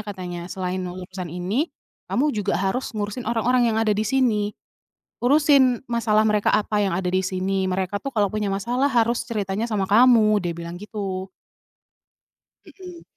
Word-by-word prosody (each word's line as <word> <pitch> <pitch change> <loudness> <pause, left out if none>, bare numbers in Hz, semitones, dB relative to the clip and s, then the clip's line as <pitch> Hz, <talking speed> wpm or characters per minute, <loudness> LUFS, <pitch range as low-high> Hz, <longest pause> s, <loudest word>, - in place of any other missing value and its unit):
katanya, 180 -4 -6
"Selain 185 0 -3
urusan 185 0 -6
ini 185 - -2 0.4
kamu 290 +4 +1
juga 205 -1 0
harus 195 +8 -1
ngurusin 210 +3 -3
orang-orang 240 +1 +2
yang 220 - 0
ada 220 -1 +2
di 205 - -1
sini. 225 -4 +1 0.7
Urusin 270 -2 +4
masalah 220 -2 +2
mereka 210 -1 +2
apa 210 0 +1
yang 195 - +1
ada 190 - -3
di 185 +1 +1
sini. 190 +1 -1
Mereka 190 +2 -1
tuh 275 - -3
kalau 210 -5 +1
punya 210 -1 -2
masalah 240 +8 0
harus 235 -1 +2
ceritanya 215 -2 -2
sama 200 -3 0
kamu," 215 -2 +5
dia 175 - -2
bilang 170 0 -6
gitu. 195 -3 -5 1.4
Mhm. 360 -3 -12
210 Hz, 155 wpm, -23 LUFS, 190-240 Hz, 1.4 s, kamu